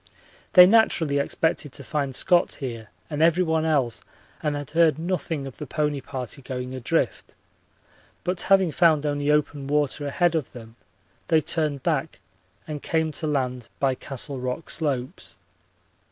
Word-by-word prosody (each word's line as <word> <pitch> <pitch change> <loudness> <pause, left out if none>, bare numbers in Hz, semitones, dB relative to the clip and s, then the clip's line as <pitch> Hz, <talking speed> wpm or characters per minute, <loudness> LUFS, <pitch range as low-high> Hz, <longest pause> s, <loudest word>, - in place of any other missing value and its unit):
They 180 -1 +11
naturally 175 -8 +3
expected 150 0 -1
to 140 - -7
find 140 -1 -2
Scott 175 +3 +2
here 115 -6 -6 0.2
and 150 -1 -3
everyone 160 -1 +3
else 135 -7 +1 0.4
and 150 -1 -1
had 145 -1 -6
heard 160 -3 +4
nothing 165 -4 -2
of 135 - -9
the 150 - -6
pony 150 0 -1
party 130 0 -6
going 125 -1 -5
adrift, 130 -2 -2 0.9
but 180 0 -1
having 190 -3 +5
found 155 -2 +3
only 145 0 -1
open 145 -2 +1
water 145 0 0
ahead 175 +4 +2
of 155 -5 -2
them 115 -2 -11 0.5
they 160 - +4
turned 150 -4 -2
back 160 -2 -1 0.5
and 150 -2 -5
came 160 -1 0
to 155 +1 -4
land 125 -5 -2
by 135 -1 +2
Castle 135 +1 -5
Rock 125 +5 -4
slopes. 140 0 -3
150 Hz, 150 wpm, -25 LUFS, 135-160 Hz, 0.9 s, They